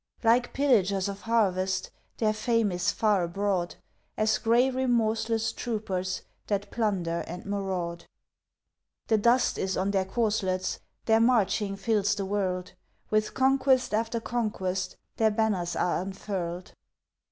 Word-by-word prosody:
Like 240 +2 +3
pillagers 200 -9 +2
of 200 0 -6
harvest, 190 -5 +1 0.3
Their 215 -2 +2
fame 225 -1 +1
is 180 0 0
far 210 -4 +2
abroad, 180 0 -1 0.4
As 215 0 +2
gray 235 +3 +4
remorseless 225 -3 +1
troopers 190 -6 -3 0.2
That 205 -1 -2
plunder 185 -7 -1
and 175 +2 -7
maraud. 190 -4 -3 1.0
The 220 -1 +4
dust 240 +4 +3
is 190 0 -1
on 195 +2 0
their 190 -2 +1
corselets; 190 -3 -1 0.3
Their 225 0 +4
marching 210 -4 +2
fills 205 0 +1
the 200 -1 -3
world; 185 -2 -2 0.4
With 215 0 +1
conquest 265 -2 +3
after 225 +2 0
conquest 200 -6 -2 0.2
Their 220 -1 +4
banners 210 -5 0
are 175 - +1
unfurled. 185 -2 -5
205 Hz, 125 wpm, -28 LUFS, 185-225 Hz, 1.0 s, gray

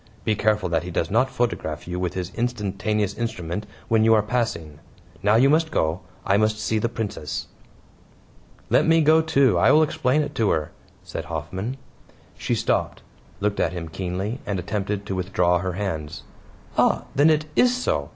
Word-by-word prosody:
Be 110 - +1
careful 105 -2 +1
that 85 -1 +1
he 90 - -7
does 85 -1 -2
not 130 +5 +3
photograph 115 - -2
you 90 +1 -3
with 90 -1 -2
his 90 0 -4
instantaneous 105 -3 -1
instrument 105 -3 -4 0.2
when 110 -1 +3
you 115 0 +6
are 105 - +3
passing. 105 -11 -2 0.4
Now 105 +1 +3
you 125 +4 +5
must 160 +3 +3
go. 80 - 0 0.3
I 100 - +3
must 110 0 +2
see 110 0 0
the 115 - 0
Princess." 105 -9 -4 1.3
"Let - - +4
me 165 0 +5
go, 160 +1 +5
too. 140 - +3
I - - +5
will 155 +1 +6
explain 155 -2 +1
it - - -6
to 110 -3 +1
her," 75 -2 0 0.3
said - - -6
Hoffman. 95 - -4 0.6
She - - -1
stopped, - - -1 0.4
looked 105 0 0
at - - +1
him 85 -2 -5
keenly, 95 +8 -3
and 100 - -2
attempted 100 +2 -3
to 100 - -3
withdraw 90 -1 +1
her 90 0 -3
hands. 85 -6 -4 0.6
"Ah, - - +3
then 145 +3 +5
it 155 -1 +2
IS 250 0 +4
so. 250 - -1
105 Hz, 180 wpm, -24 LUFS, 90-120 Hz, 1.3 s, you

